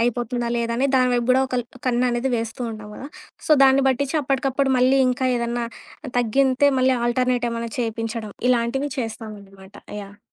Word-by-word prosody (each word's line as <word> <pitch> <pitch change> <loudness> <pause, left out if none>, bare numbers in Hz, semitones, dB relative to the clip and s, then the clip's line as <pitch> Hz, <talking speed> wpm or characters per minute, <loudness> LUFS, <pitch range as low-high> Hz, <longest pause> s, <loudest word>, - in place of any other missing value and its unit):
అయిపోతుందా 240 0 -1
లేదా 235 0 -1
అని 265 +3 +2
దాని 255 -1 +4
వైపు 240 -1 0
కూడా 260 +1 +5
ఒకల్ 250 -1 -1 0.2
కన్ను 250 0 +1
అనేది 240 +2 -1
వేస్తూ 225 +1 -5
ఉంటాం 215 -1 -8
కదా. 275 - -8 0.4
సో, - - -5
దాన్ని 270 +1 +5
పట్టిచ్చి 270 +3 -1
అప్పటికప్పుడు 270 0 0
మళ్ళీ 260 +2 +4
ఇంకా 255 +1 0
ఏదన్నా 235 0 -2 0.5
తగ్గితే 260 +4 +3
మళ్ళీ 260 0 +3
ఆల్టర్‌నేట్ 245 0 +1
ఏమన్నా 230 0 -4
చేపించడం. 225 -1 -4 0.2
ఇలాంటివి 250 +4 +1
చేస్తామనమాట. 205 -4 -7 0.3
యాహ్! 200 +1 -13
240 Hz, 155 wpm, -22 LUFS, 230-260 Hz, 0.5 s, కూడా